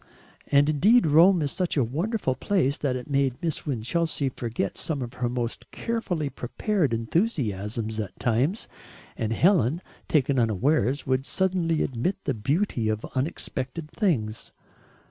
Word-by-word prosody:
And 140 0 +4
indeed 195 - +4
Rome 165 +3 +5
is 140 - -1
such 180 -4 -1
a 135 - +4
wonderful 160 - -1
place 145 -2 +1
that 135 -3 0
it 125 - -5
made 135 -3 +1
Miss 160 -2 -3
Winchelsea 140 +3 0
forget 115 -5 -3
some 145 -5 -1
of 120 0 -7
her 125 -1 -2
most 120 -1 -4
carefully 190 -10 -2
prepared 150 - -1
enthusiasms 115 - -1
at 105 -3 -5
times, 130 - 0 0.5
and 110 -1 -2
Helen, 160 - +3 0.3
taken 140 -3 +2
unawares, 120 +4 +1
would 130 +1 0
suddenly 180 -4 +1
admit 130 +10 -1
the 140 - 0
beauty 130 - 0
of 110 0 -2
unexpected 140 +1 -3
things. 130 - -1
140 Hz, 140 wpm, -26 LUFS, 120-170 Hz, 0.5 s, Rome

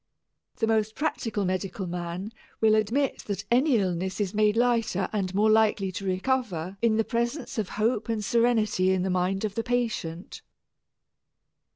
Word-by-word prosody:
The 225 - 0
most 220 -1 +1
practical 225 -9 -1
medical 190 +2 -2
man 175 +3 -5 0.3
will 220 -1 +4
admit 230 +6 +1
that 200 -1 -4
any 255 +1 +4
illness 185 -1 -1
is 200 -3 -1
made 210 +1 +2
lighter 230 -5 +1
and 195 -3 -1
more 215 +2 +4
likely 215 -3 +3
to 195 +2 -5
recover 190 -3 -1
in 225 -2 +3
the 225 - +3
presence 235 +3 -2
of 205 - -2
hope 225 +1 0
and 215 -2 -1
serenity 225 -5 +2
in 185 -1 0
the 190 - -1
mind 185 +3 0
of 205 - -3
the 230 - -1
patient. 220 -8 -3
215 Hz, 160 wpm, -27 LUFS, 190-230 Hz, 0.3 s, will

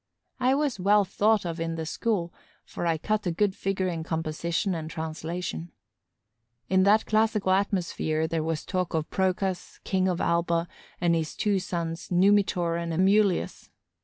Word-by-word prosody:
I 255 +1 +3
was 285 -7 -1
well 200 +2 +4
thought 210 +1 +2
of 170 -1 -4
in 165 0 -2
the 160 -1 -4
school, 175 0 -1 0.3
for 175 - -4
I 165 -1 +2
cut 210 +4 -1
a - - +1
good 195 +3 +1
figure 190 -1 -1
in 170 -2 -2
composition 165 +4 -2
and 160 -2 -4
translation. 160 - -5 1.0
In 190 0 +4
that 210 +2 +4
classical 215 -3 +2
atmosphere, 175 -5 0
there 165 0 -1
was 160 -1 -2
talk 185 -3 -2
of 160 -1 -2
Procas, 190 0 -1
King 190 -1 +1
of 180 -2 0
Alba, 170 0 +1 0.3
and 170 -1 +2
of 165 - +2
his 160 -1 -4
two 205 -2 +1
sons, 170 -2 -4
Numitor 180 -2 +3
and 170 0 -3
Amulius. 190 +2 +2
180 Hz, 160 wpm, -27 LUFS, 165-200 Hz, 1.0 s, well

